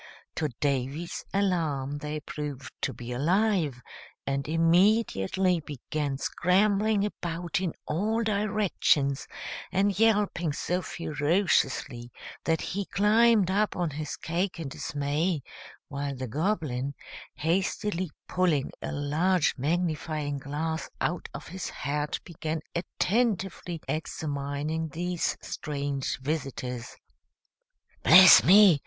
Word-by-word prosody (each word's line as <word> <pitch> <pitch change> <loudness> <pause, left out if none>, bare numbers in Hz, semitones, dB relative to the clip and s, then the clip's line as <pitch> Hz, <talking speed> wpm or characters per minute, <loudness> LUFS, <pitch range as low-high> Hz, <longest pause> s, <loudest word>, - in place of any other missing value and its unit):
To 155 - 0
Davy's 140 +4 -2
alarm 160 -8 0
they 150 +1 -4
proved 145 -3 -6
to - - 0
be 120 0 -8
alive, 160 - +1 0.4
and 140 0 -1
immediately 175 - +3
began 145 -1 -4
scrambling 200 +6 +2
about 175 -3 -3
in 180 -4 -1
all 215 +8 0
directions, 200 -10 +1 0.4
and 195 +1 +1
yelping 205 -8 +2
so 180 +5 -1
ferociously 145 -7 0 0.3
that 165 0 +1
he 200 +1 -3
climbed 210 -1 +4
up 210 +2 +1
on 175 -3 -1
his 150 +1 -5
cake 175 +2 -2
in 155 -4 -4
dismay, 145 +3 -1 0.4
while 140 -1 -4
the 130 0 -5
Goblin, 140 - -1 0.4
hastily 185 +2 0 0.2
pulling 170 -7 +1
a - - -4
large 155 +5 +1
magnifying 150 -1 -1
glass 155 +4 -3
out 175 0 -2
of - - -8
his 185 +2 -5
hat, 145 +2 -2
began 160 -2 -4
attentively 190 -2 -1
examining 150 0 -3
these 175 +3 -2
strange 140 -2 -3
visitors. 130 -4 -4 1.0
"Bless 185 +2 +9
me!" 190 -3 +7
160 Hz, 105 wpm, -28 LUFS, 145-185 Hz, 1.0 s, Bless